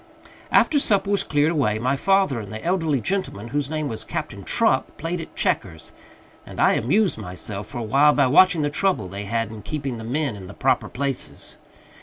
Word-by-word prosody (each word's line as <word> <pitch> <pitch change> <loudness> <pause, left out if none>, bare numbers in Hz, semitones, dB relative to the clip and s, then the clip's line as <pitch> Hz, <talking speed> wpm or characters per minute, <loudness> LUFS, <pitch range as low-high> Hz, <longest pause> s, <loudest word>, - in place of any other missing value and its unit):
After 295 - +4
supper 200 -6 +2
was 200 - +1
cleared 150 +1 +1
away, 130 -10 +1
my 130 +5 0
father 195 -5 +2
and 105 -2 -8
the 110 0 -7
elderly 165 -6 +1
gentleman, 150 - -3
whose 145 +2 -2
name 155 -1 -2
was 110 -5 -5
Captain - - -5
Truck, - - +1
played 165 +2 -3
at 165 - -11
checkers; 80 -5 -2 0.5
and - - -10
I - - +5
amused 180 - +1
myself 100 +1 -6
for 120 - -8
a 120 - -3
while 140 +7 +4
by 140 - +3
watching 165 +4 +5
the 145 - 0
trouble 180 - 0
they 100 +2 -6
had 115 +1 -2
in 110 -1 -8
keeping 135 +1 -4
the 115 - -8
men 135 +1 -2
in 95 -2 -10
the - - -11
proper - - +1
places. 135 0 -4
140 Hz, 200 wpm, -23 LUFS, 110-165 Hz, 0.5 s, I